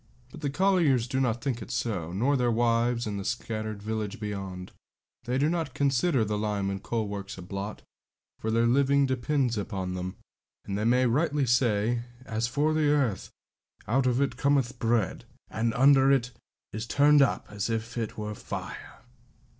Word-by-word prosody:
But - - -11
the 145 - -1
colliers 155 -8 +2
do 130 +1 -1
not 120 -2 0
think 125 -4 -2
it - - -8
so, 90 -8 -2
nor 125 +10 +1
their 125 -2 +2
wives 120 +1 +1
in 105 -2 -3
the 100 - -4
scattered 110 -2 -4
village 110 0 -3
beyond; 95 -3 -5 0.5
they 125 +2 0
do 145 +2 +3
not 160 -5 -2
consider 135 -2 +2
the 105 0 -2
lime 105 -2 -1
and 100 0 -4
coal 115 -3 -2
works 100 -1 -6
a 95 - -8
blot, 100 +3 -6 0.6
for 110 - -3
their 115 +1 +2
living 140 +3 +3
depends 130 -2 0
upon 95 -2 -3
them, 90 +1 -4 0.5
and 100 - -3
they 105 +2 -1
may 125 +2 +4
rightly 145 +3 +1
say, 120 -2 +2 0.2
'As 115 -1 -1
for 145 +5 +1
the 155 -1 +2
earth, 135 -10 +1 0.6
out 130 +3 +2
of 125 0 +2
it 140 -1 0
cometh 135 -3 +1
bread: 115 -4 0 0.3
and 115 +1 0
under 135 +1 +6
it 125 -2 +2 0.4
is 110 +2 -4
turned 145 +3 +5
up 135 - +2
as 105 +2 -3
it 115 0 -3
were 105 0 -4
fire.' - - -8
120 Hz, 175 wpm, -28 LUFS, 105-135 Hz, 0.6 s, under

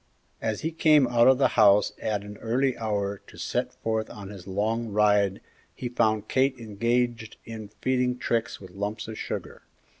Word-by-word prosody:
As 110 -1 -2
he 160 - -2
came 155 -3 +5
out 120 -1 +4
of 130 0 +6
the 135 - +3
house 105 -1 +5
at 105 -2 -1
an 105 0 -9
early 130 +3 +1
hour 100 -3 -2
to - - -14
set - - -2
forth 110 -1 -2
on 100 -2 -9
his 100 -3 -10
long 110 +4 -1
ride 105 -2 +2 0.3
he 125 - -4
found 110 -3 +1
Kate 130 0 +2
engaged 115 +1 -1
in 110 -2 -7
feeding 125 -1 +1
Trix 115 -1 -1
with 95 -2 -12
lumps 105 +3 -4
of 110 - -6
sugar. - - -5
110 Hz, 175 wpm, -26 LUFS, 105-120 Hz, 0.3 s, of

